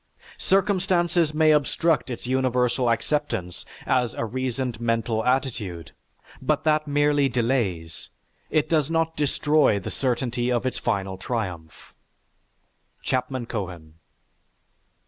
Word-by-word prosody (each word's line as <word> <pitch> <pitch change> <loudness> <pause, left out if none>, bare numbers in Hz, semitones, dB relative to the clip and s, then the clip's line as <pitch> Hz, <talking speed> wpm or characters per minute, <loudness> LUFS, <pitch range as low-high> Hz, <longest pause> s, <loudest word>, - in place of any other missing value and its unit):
Circumstances 180 -4 +2
may 155 0 +4
obstruct 150 +1 +2
its 120 - -5
universal 125 -1 +1
acceptance 115 - -1 0.2
as 125 -3 +1
a - - -2
reasoned 125 -1 -3
mental 115 -1 0
attitude, 110 - -1 0.5
but - - 0
that 155 -1 +2
merely 145 -1 +2
delays, 115 -10 -1 0.4
it 155 0 +1
does 155 -3 +1
not 165 0 0
destroy 150 -4 +2
the 95 - -6
certainty 125 -1 -1
of 120 0 0
its 125 -1 -2
final 95 -4 -2
triumph." 90 -9 -5 1.1
(_C. 130 -1 -1
Cohen. 90 -8 -5
125 Hz, 105 wpm, -24 LUFS, 115-150 Hz, 1.1 s, may